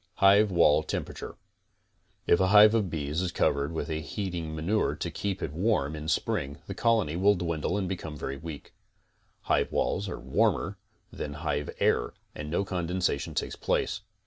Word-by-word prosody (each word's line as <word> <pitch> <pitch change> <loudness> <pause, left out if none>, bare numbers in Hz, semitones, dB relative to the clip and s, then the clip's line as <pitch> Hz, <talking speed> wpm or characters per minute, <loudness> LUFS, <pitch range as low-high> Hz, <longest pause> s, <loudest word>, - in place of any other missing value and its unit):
HIVE 100 +2 +5
WALL 85 -4 +4
TEMPERATURE - - -5 0.9
If 85 - +4
a 95 - +3
hive 105 +2 +8
of 105 -5 +1
bees 75 0 -2
be 90 - -1
covered 70 -3 +1
with 80 - -3
heating 80 0 -4
manure 95 +8 0
to - - -4
keep 100 -1 -3
it 75 - -3
warm 80 -5 +1
in 75 0 -6
spring 70 -2 -1
the 95 - -5
colony 110 -7 +1
will 100 +3 +4
dwindle 85 0 -1
and 95 -2 -1
become 80 -5 -5
wery 70 0 -4
weak. 80 -3 -8 0.7
Hive - - +1
walls 100 0 0
are 85 - -5
warmer - - 0 0.3
than 75 - -5
hive 75 -1 -1
air - - +1 0.2
and 75 0 -6
no 85 +5 0
condensation 90 -5 -1
takes - - -2
place. - - -1
85 Hz, 165 wpm, -28 LUFS, 75-100 Hz, 0.9 s, hive